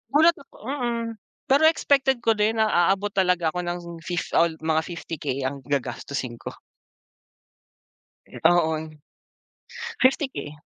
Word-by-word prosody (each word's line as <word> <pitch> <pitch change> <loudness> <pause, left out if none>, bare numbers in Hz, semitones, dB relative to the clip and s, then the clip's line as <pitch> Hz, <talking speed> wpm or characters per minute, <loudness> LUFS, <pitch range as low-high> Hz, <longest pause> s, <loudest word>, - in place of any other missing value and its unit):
Gulat 325 +3 +7
ako 275 - -17
mm. 240 -3 -2 0.4
Pero 280 +3 +5
expected 275 -4 +3
ko 225 - +5
din 215 +1 +1
na 220 - +4
aabot 195 +4 +2
talaga 180 -4 +2
ako 180 - -4
ng 175 0 -3 0.3
fif 175 -2 -3
al 165 -1 +3 0.3
50K 160 -5 -5
ang 135 +2 -2
gagastusin 130 -2 -3
ko. - - -7 1.7
Oo. 165 -1 +3 1.3
50k. 260 - +1
180 Hz, 115 wpm, -24 LUFS, 160-250 Hz, 1.7 s, Gulat